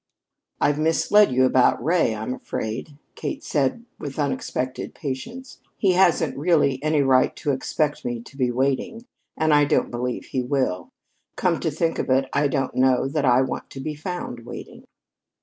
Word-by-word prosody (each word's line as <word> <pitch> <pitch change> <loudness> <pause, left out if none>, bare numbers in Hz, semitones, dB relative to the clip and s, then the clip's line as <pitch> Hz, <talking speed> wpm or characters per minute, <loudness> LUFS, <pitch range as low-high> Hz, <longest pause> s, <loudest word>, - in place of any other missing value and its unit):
"I've 145 0 +2
misled 165 +5 +4
you 130 +1 +4
about 130 -2 +3
Ray, 160 -7 +2
I'm 110 +4 -4
afraid," 130 +4 -5 0.2
Kate - - -5
said 145 - 0
with 140 -2 -6
unexpected 130 -3 -3
patience. 175 - -6 0.2
"He 195 - +3
hasn't 175 -4 +3
really 145 -4 +2
any 155 -1 +2
right 130 -1 +3
to 150 - -1
expect 145 +3 -1
me 120 -1 -3
to 135 - -15
be 130 -3 +1
waiting, 135 - -1 0.3
and 155 -1 +2
I 145 0 +5
don't - - +1
believe 125 +1 -3
he 130 - -2
will. 125 -8 -1 0.5
Come 175 -3 +1
to 165 - -1
think 165 +2 -1
of - - -2
it, 135 +1 +3
I 145 +1 +3
don't 135 -2 -1
know 130 0 +3
that 145 0 0
I 125 +1 +5
want 130 - -5
to 135 - -9
be 150 +3 -4
found 150 -6 -6
waiting." - - -10
140 Hz, 170 wpm, -23 LUFS, 130-155 Hz, 0.5 s, I